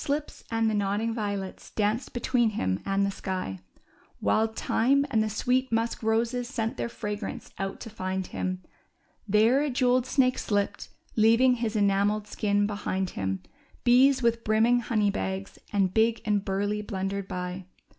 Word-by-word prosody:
Oxlips 290 +1 -3
and 225 -1 +1
the 220 - +1
nodding 205 +2 0
violets 200 -4 -4
danced 215 +4 -1
between 240 -1 +1
him 95 0 0
and 195 0 +2
the 200 - 0
sky; 185 - -4 0.6
Wild 220 0 +1
thyme 275 +5 +2
and 220 -4 +3
the 215 - 0
sweet 250 +4 0
musk 230 +1 0
roses 230 +2 0
sent 225 -4 -2
their - - -3
fragrance 210 -3 -5
out 195 0 -3
to 225 - -7
find 190 -2 -3
him; 185 0 -4 0.6
There 220 +6 +4
a 295 - 0
jewelled 250 -1 +2
snake 255 -1 +2
slipt, 205 -1 -1 0.3
leaving 230 +3 +5
his 230 -2 -2
enamelled 205 +1 +2
skin 205 -1 0
behind 195 -2 -2
him; 95 -1 -3 0.4
Bees 260 +2 +5
with 230 0 +2
brimming 225 +3 +3
honey 215 -3 +1
bags^ 95 - -4
and 195 -3 +1
big 225 +1 +2
and 205 -2 +1
burly^ 205 +2 -1
blundered 195 -1 -3
by. 180 +1 -5
215 Hz, 155 wpm, -27 LUFS, 195-235 Hz, 0.6 s, leaving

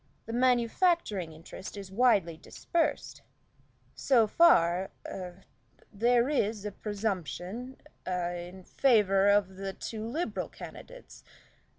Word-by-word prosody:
The 225 - -6
manufacturing 245 - +1
interest 165 +5 -10
is 195 -2 -8
widely 200 -7 +3
dispersed. 325 - -2 0.7
So 245 -5 +3
far 190 - +4 0.2
a 185 0 -8 0.5
there 235 +3 +3
is 220 -7 -1
a 210 - -3
presumption 205 +4 -4 0.3
a 175 -1 -3
in 185 +1 -13
favor 205 -5 +3
of 200 -2 +2
the 195 0 -4
two 215 +2 -6
Liberal 300 +10 -3
candidates. - - -12
205 Hz, 105 wpm, -29 LUFS, 185-245 Hz, 0.7 s, far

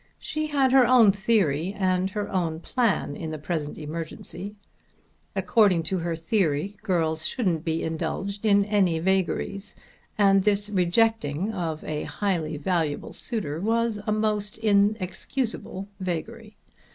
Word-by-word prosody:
She 310 0 -3
had 275 -3 +2
her 260 -2 +6
own 235 -5 +7
theory 195 -4 +1
and 185 -1 +1
her 205 +1 -3
own 170 -4 -1
plan 205 - 0
in 160 - -5
the 155 - -4
present 150 -1 -4
emergency. 165 +5 -6 0.8
According 190 -2 +3
to 185 +3 -1
her 170 0 -2
theory 165 +1 0
girls 160 -6 0
shouldn't 180 - -1
be 165 -1 -1
indulged 175 +5 -3
in 200 -2 +4
any 195 -5 +2
vagaries, 190 +3 -1 0.4
and 195 -2 +5
this 205 0 +1
rejecting 190 -2 +1
of 165 -5 -3
a 150 -1 -3
highly 170 -7 -2
valuable 155 -2 -1
suitor 165 - -3
was 225 0 0
a - - +2
most 210 -1 0
inexcusable 205 0 0
vagary. 205 +5 -5
190 Hz, 130 wpm, -26 LUFS, 165-210 Hz, 0.8 s, own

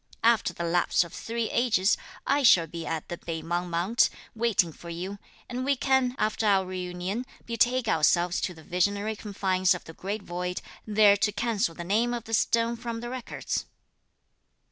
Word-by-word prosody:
After 230 -1 +4
the 170 - -5
lapse 175 +1 +2
of 170 - -11
three 230 0 -3
ages, 220 -5 +3 0.3
I 280 +1 +2
shall 185 -10 +6
be 165 +1 -7
at 160 -2 -3
the 175 - -6
Pei 160 -1 -5
Mang 175 +2 -2
mount, 175 +7 +2 0.2
waiting 220 -8 +1
for 170 - -11
you; 185 +4 -5 0.3
and 250 +1 -4
we 280 +1 +2
can, 260 -1 +2
after 215 0 0
our 195 -2 +4
reunion, 185 +4 -4 0.2
betake 240 +1 +1
ourselves 175 -1 +3
to 180 - -2
the 160 - -14
Visionary 200 +5 0
Confines 190 -3 +1
of 180 - -8
the 160 - -11
Great 200 +4 -4
Void, 180 0 -4 0.2
there 210 -1 +5
to 210 +1 +1
cancel 210 -4 -1
the 175 - -6
name 225 +7 +1
of 235 - -5
the 225 - -8
stone 230 +1 +2
from 230 -1 -5
the 240 0 -5
records." 255 -1 -4
200 Hz, 180 wpm, -27 LUFS, 175-230 Hz, 0.3 s, shall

